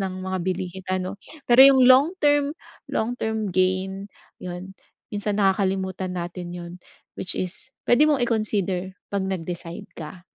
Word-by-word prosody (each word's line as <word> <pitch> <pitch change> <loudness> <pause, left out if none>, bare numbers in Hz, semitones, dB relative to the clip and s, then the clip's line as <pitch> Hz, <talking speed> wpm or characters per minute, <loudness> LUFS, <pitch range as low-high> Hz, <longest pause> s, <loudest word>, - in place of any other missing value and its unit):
ng 185 -1 -4
mga 190 0 -2
bilihin 185 +1 -4
ano. 185 +1 -2 0.2
Pero 245 +2 +6
yung 265 -1 +8
long 260 +4 +7
term, 290 -1 +2 0.3
long 230 +2 -1
term 220 -4 -2
gain, 190 +2 0 0.3
'yon 180 +1 -7 0.4
minsan 205 0 -1
nakakalimutan 190 -2 0
natin 175 0 -5
'yon, 175 0 -8 0.5
which 185 - -1
is 185 +7 -4 0.2
puwede 295 +6 +5
mong 275 -5 +2
i-consider 195 -5 0 0.2
pag 200 - 0
nag-decide 175 -2 -5
ka. 175 +2 -9
190 Hz, 140 wpm, -24 LUFS, 185-220 Hz, 0.5 s, yung